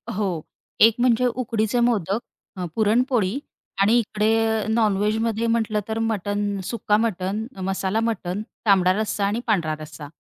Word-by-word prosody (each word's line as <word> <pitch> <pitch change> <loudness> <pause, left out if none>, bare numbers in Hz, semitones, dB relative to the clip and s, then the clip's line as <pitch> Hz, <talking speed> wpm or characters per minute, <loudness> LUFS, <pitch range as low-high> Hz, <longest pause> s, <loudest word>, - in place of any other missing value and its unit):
हो, 190 -6 -1 0.4
एक 225 0 +7
म्हणजे 250 0 +3
उकडीचे 230 -2 -1
मोदक, 220 -4 +1 0.4
अ, 180 - -3
पुरणपोळी 225 0 +2 0.4
आणि 215 +4 +5
इकडे 220 0 +1
नॉनव्हेजमध्ये 220 +1 +1
म्हटलं 220 -2 +1
तर 220 0 -2
मटण, 205 -2 -1
सुक्का 210 0 0
मटण, 210 -1 -1 0.2
मसाला 190 +2 -1
मटण, 205 -4 -2 0.2
तांबडा 185 -3 +4
रस्सा 210 -2 -1
आणि 205 +3 0
पांढरा 170 -8 +1
रस्सा. 155 -1 -9
215 Hz, 130 wpm, -23 LUFS, 195-225 Hz, 0.4 s, एक